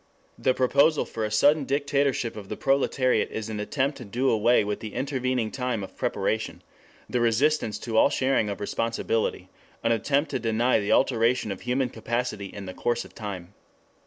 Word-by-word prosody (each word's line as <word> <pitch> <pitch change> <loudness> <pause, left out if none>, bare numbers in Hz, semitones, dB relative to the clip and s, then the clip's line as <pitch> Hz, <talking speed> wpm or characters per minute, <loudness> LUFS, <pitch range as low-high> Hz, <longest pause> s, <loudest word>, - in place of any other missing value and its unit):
The 130 - +2
proposal 140 +4 +3
for 110 - -5
a 105 - -1
sudden 145 +8 +4
dictatorship 140 -3 0
of 100 -3 -9
the - - -4
proletariat 135 -3 +1
is 110 0 -5
an 105 -1 -4
attempt 135 +6 -1
to - - -7
do 125 +5 0
away 115 +1 +4
with 105 0 -3
the 110 -2 -8
intervening 130 -4 -1
time 125 -5 -2
of 95 - -10
preparation; - - -2 0.4
the 125 - -1
resistance 120 -1 +2
to 115 -2 -2
all 140 - +6
sharing 130 -6 +1
of 100 - -4
responsibility 115 +1 -1 0.3
an 115 - +2
attempt 140 +7 +1
to 130 - -1
deny 115 +1 +2
the 100 - -2
alteration 120 -3 +2
of 95 - -6
human 125 +1 0
capacity 115 -2 -3
in 100 +1 -9
the 95 - -7
course 120 +3 -1
of - - -15
time. 100 -4 -7
120 Hz, 180 wpm, -26 LUFS, 110-135 Hz, 0.4 s, all